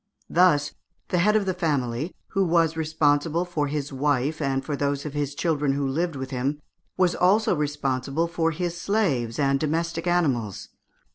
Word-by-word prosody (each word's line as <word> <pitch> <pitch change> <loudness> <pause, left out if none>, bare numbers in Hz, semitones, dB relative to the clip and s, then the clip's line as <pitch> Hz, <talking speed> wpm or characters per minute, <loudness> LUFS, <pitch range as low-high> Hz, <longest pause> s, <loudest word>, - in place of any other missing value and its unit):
Thus 150 -5 +4 0.4
the 180 - +1
head 210 +5 +3
of 210 -2 +2
the 185 - 0
family, 145 -4 -1
who 195 - +1
was 165 -2 +2
responsible 160 +1 +1
for 160 -5 -1
his 145 -1 -3
wife 145 +2 0
and 135 -2 -1
for 145 - -2
those 140 0 -1
of 150 - -5
his 145 -1 -2
children 150 -4 0
who 140 0 -1
lived 160 +4 -1
with 130 0 -5
him, 135 +3 -1 0.4
was 180 -2 +3
also 195 +2 +3
responsible 145 0 -1
for 165 -1 0
his 170 +2 -3
slaves 140 - 0
and 140 -1 +2
domestic 165 +3 -1
animals. 135 - 0
150 Hz, 165 wpm, -25 LUFS, 140-170 Hz, 0.4 s, Thus